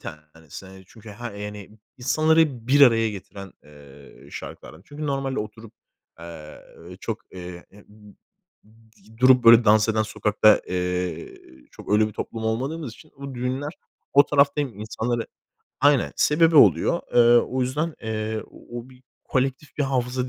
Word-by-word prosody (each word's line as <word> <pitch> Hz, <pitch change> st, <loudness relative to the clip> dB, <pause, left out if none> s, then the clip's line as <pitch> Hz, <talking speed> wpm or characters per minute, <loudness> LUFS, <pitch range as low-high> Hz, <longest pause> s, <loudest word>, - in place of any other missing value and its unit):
tanesi, 75 Hz, +3 st, -11 dB
eee, 95 Hz, 0 st, -14 dB
çünkü 110 Hz, +1 st, -14 dB
ha 120 Hz, +3 st, -7 dB
yani, 105 Hz, 0 st, -8 dB, 0.3 s
insanları 155 Hz, -2 st, +1 dB
bir 145 Hz, +2 st, +4 dB
araya 115 Hz, -4 st, +5 dB
getiren, 100 Hz, -1 st, -10 dB
eee, 70 Hz, -1 st, -17 dB
şarkılardan. 80 Hz, -, -10 dB
Çünkü 150 Hz, +3 st, -7 dB
normalde 135 Hz, -1 st, -2 dB
oturup, 110 Hz, +1 st, -8 dB, 0.5 s
eee, 80 Hz, -2 st, -11 dB, 0.4 s
çok, 110 Hz, -1 st, -4 dB
eee, 90 Hz, -1 st, -9 dB, 1.0 s
d 110 Hz, 0 st, -23 dB
durup, 130 Hz, 0 st, +5 dB
böyle, 115 Hz, 0 st, +8 dB
dans 110 Hz, +1 st, +4 dB
eden 110 Hz, 0 st, +1 dB
sokakta, 110 Hz, 0 st, +2 dB
eee, 90 Hz, -2 st, -3 dB, 0.4 s
çok -, -, -8 dB
öyle 105 Hz, +1 st, +3 dB
bir -, -, -11 dB
toplum 110 Hz, +1 st, -6 dB
olmadığımız 130 Hz, +4 st, -3 dB
için 155 Hz, +6 st, -18 dB
bu 140 Hz, -1 st, -8 dB
düğünler 130 Hz, +4 st, -3 dB, 0.4 s
o 140 Hz, 0 st, +6 dB
tarafta 140 Hz, 0 st, +2 dB
hem 120 Hz, -8 st, -5 dB
insanları 115 Hz, +2 st, -3 dB, 0.5 s
Aynen 145 Hz, -3 st, +3 dB
sebebi 160 Hz, +1 st, +3 dB
oluyor. 170 Hz, +4 st, +5 dB
Eee, -, -, +6 dB, 0.2 s
o 130 Hz, +2 st, -1 dB
yüzden, 150 Hz, +6 st, -2 dB
eee, 110 Hz, -1 st, -3 dB
o 120 Hz, -, -10 dB
o 125 Hz, +3 st, -15 dB
bir 130 Hz, 0 st, -19 dB, 0.2 s
kolektif 135 Hz, +3 st, -2 dB
bir -, -, +2 dB
hafıza 130 Hz, -1 st, -2 dB
115 Hz, 145 wpm, -23 LUFS, 105-135 Hz, 1.0 s, böyle